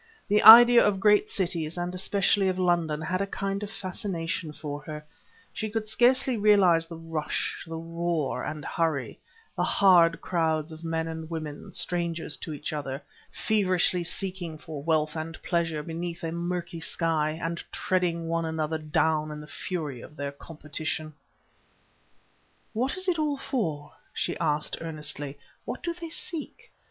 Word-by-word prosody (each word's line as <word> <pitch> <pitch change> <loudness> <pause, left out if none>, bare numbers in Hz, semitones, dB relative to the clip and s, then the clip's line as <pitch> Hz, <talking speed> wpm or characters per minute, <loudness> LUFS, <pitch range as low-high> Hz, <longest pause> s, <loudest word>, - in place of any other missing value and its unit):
The 210 +1 +3
idea 235 +2 +11
of 200 -2 +2
great 210 +1 +4
cities, 170 -3 -1
and 175 +1 -2
especially 195 +1 +2
of 185 -1 0
London, 170 -4 +1
had 185 +4 -1
a 200 - -1
kind 195 0 -3
of 210 - -5
fascination 180 -5 -3
for 145 -1 -6
her: 150 -1 -7 0.5
she 220 - -3
could 220 0 -2
scarcely 250 +3 +3
realize 195 -6 +5
the 165 -1 -8
rush, 165 -2 -3
the 165 - -5
roar 165 -2 -2
and 150 0 -5
hurry, 160 -5 -1 0.4
the - - -1
hard 175 -4 +5
crowds 160 -2 0
of 160 +1 -10
men 165 0 -1
and 160 0 -6
women, 155 -3 -6
strangers 170 -3 -2
to - - -7
each 150 +1 -4
other, 140 -2 -4 0.3
feverishly 185 -4 +1
seeking 175 -2 -4
for 155 -2 -8
wealth 155 0 +1
and 160 0 -5
pleasure 165 -4 0
beneath 170 +1 -5
a 165 - -2
murky 170 0 -3
sky, 160 -1 0
and 170 0 -3
treading 175 -3 0
one 165 0 0
another 160 0 -2
down 155 0 +1
in 150 0 -6
the 150 - -9
fury 150 -6 -4
of 150 - -12
their 140 -1 -4
competition. 155 +1 -5 1.6
"What 255 +9 -1
is 375 0 -2
it 345 -3 +1
all 295 -2 0
for?" 165 - -3 0.2
she 175 - -1
asked 150 -2 0
earnestly. 150 -3 -4 0.3
"What - - -5
do 340 - -1
they 335 -1 -8
seek? 320 -1 -5
165 Hz, 155 wpm, -27 LUFS, 155-190 Hz, 1.6 s, idea